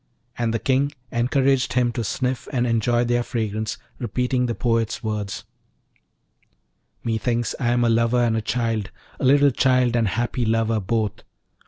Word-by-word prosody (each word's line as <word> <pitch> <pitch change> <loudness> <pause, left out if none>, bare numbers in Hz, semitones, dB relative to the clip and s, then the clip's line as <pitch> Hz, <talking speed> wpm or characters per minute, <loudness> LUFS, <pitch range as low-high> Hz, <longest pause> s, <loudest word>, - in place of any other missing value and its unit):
And 115 -1 -1
the 115 - 0
King 135 +4 +1 0.2
encouraged 130 +2 +1
him 125 -1 +2
to 120 0 -3
sniff 125 +4 -2
and 125 -3 +1
enjoy 120 +1 +2
their 120 0 +1
fragrance, 110 -2 -3 0.2
repeating 125 +1 0
the 115 - -2
poet's 115 -2 0
words: 105 -2 -3 1.6
Methinks 115 0 -1
I 125 - 0
am 120 0 +2
a 120 - +3
lover 115 +2 +3
and 115 -1 +2
a 110 - 0
child, 115 -3 -1 0.3
A - - -1
little 140 +1 +5
child 125 -1 +2
and 115 -2 +2
happy 120 +4 -1
lover, 115 0 +1
both! 105 +1 -1
120 Hz, 155 wpm, -23 LUFS, 115-125 Hz, 1.6 s, little